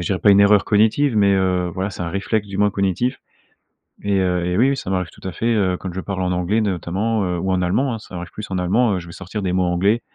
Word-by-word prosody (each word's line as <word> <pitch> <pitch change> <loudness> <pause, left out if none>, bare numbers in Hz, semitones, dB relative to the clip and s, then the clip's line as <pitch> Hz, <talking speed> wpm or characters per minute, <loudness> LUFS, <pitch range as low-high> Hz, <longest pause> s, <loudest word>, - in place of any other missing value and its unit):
dirais 90 +2 -1
pas 105 - +4
une 100 0 +6
erreur 100 0 +5
cognitive, 110 +6 +2
mais 100 -2 +4
heu, 90 -2 +1
voilà, 95 +2 -2
c'est 95 - -9
un 85 - -3
réflexe 100 +4 -1
du 100 - -6
moins 105 +1 +3
cognitif 100 +6 -1 0.9
et 100 -1 +1
heu, 90 -2 0
et 90 +1 -1
oui, 125 +5 +4
oui, 140 - 0
ça 110 - -6
m'arrive 90 -2 -1
tout - - -10
à - - -3
fait, 115 +8 0
heu, 95 -4 +1
quand 95 - -5
je 95 - -4
parle 95 -1 -4
en 90 - 0
anglais, 90 +5 0
de 105 - +1
notamment, 100 +5 -1
heu, 90 -1 -2
ou 95 +2 -1
en 95 -1 +1
allemand, 120 +9 +1
hein, 110 - -5
ça 100 - -12
arrive 90 0 -6
plus 105 - -8
en 95 - -1
allemand, 105 +6 +2
heu, - - -2
je 85 - -10
vais - - -10
sortir 95 +4 -6
des 90 - -1
mots 95 - +2
anglais, 95 +6 +1
95 Hz, 290 wpm, -20 LUFS, 90-105 Hz, 0.9 s, une